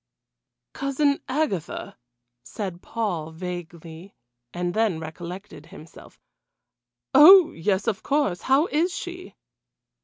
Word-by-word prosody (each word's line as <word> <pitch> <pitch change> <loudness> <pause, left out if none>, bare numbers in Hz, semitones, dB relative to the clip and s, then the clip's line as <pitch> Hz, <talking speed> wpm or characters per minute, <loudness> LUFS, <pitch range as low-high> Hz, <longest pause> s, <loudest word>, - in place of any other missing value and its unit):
"Cousin 280 +1 0
Agatha!" 260 - -3 0.5
said 185 - -7
Paul 180 -9 -3
vaguely, 170 +1 -9 0.4
and 175 0 -3
then 215 -7 0
recollected 170 +1 -9
himself. 160 -1 -15 0.9
"Oh, 350 +5 +9
yes, 190 +4 -1
of 220 -2 -2
course 275 - 0
how 270 +4 +3
is 340 +2 0
she?" 360 +1 -8
195 Hz, 95 wpm, -24 LUFS, 170-280 Hz, 0.9 s, Oh